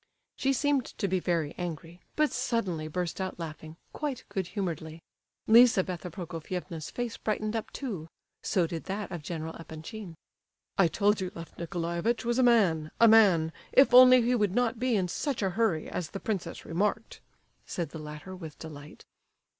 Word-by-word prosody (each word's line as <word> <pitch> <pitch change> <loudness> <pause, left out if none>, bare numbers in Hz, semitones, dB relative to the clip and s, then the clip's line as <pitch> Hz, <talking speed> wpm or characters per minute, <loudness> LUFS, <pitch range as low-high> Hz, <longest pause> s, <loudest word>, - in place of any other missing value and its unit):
She 270 - +1
seemed 280 -1 +1
to 200 - 0
be 190 0 +1
very 165 -4 -1
angry, 170 0 -6
but 305 -1 +2
suddenly 230 -11 -1
burst 175 +3 -3
out 185 0 -4
laughing, 160 -1 -8 0.2
quite 290 -4 -3
good 190 -3 -2
humouredly. 165 -5 -4 0.4
Lizabetha 195 -6 +5
Prokofievna's 170 -1 -6
face 245 -2 -4
brightened 215 0 -2
up, 225 - -3
too; 200 - -5 0.3
so 180 -3 +1
did 165 -1 -5
that 195 0 -4
of 175 -3 -5
General 160 +1 -5
Epanchin. 165 +4 -8 0.6
"I 195 - +5
told 205 +4 +2
you 185 -1 -3
Lef 165 -1 -9
Nicolaievitch 170 +7 -2
was 240 +2 +1
a - - +6
man—a 210 -5 +4
man—if 210 +3 +4
only 255 0 +9
he 245 +2 +2
would 210 -5 +1
not 240 -2 +1
be 250 -1 +1
in 190 -3 +1
such 260 - -2
a 190 - +1
hurry, 195 -6 0
as 175 - -4
the 195 - -6
princess 190 -6 -4
remarked," 210 +6 -2 0.5
said 170 -4 -3
the 160 - -7
latter, 150 +5 -8
with 160 -5 -9
delight. 150 -2 -10
185 Hz, 160 wpm, -29 LUFS, 165-225 Hz, 0.6 s, only